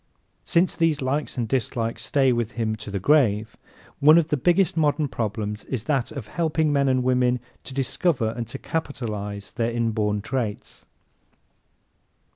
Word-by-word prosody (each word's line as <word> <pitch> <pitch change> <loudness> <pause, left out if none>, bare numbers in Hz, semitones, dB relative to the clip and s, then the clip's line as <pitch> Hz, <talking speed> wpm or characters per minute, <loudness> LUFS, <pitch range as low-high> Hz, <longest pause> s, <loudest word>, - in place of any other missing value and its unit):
Since 175 +2 +2
these 165 -3 +2
likes 140 +1 -2
and 120 -2 -1
dislikes 115 -2 -2
stay 135 -3 +3
with 120 -1 -2
him 110 -2 -1
to 105 0 -8
the 100 -1 -2
grave, 110 -4 +2 0.4
one 155 +3 +7
of 165 -2 +2
the - - +2
biggest 175 +7 +2
modern 150 -1 +2
problems 105 -3 -3
is 125 -6 -3
that 135 -4 0
of 135 -6 -6
helping 160 +3 0
men 140 -1 +2
and 130 -1 +2
women 125 -1 +2 0.3
to 135 - -6
discover 135 -2 +1
and 115 -1 -4
to 120 - -7
capitalize 105 -11 -4
their 115 0 -1
inborn 110 -3 0
traits. 115 -2 -4
125 Hz, 155 wpm, -24 LUFS, 110-145 Hz, 0.4 s, one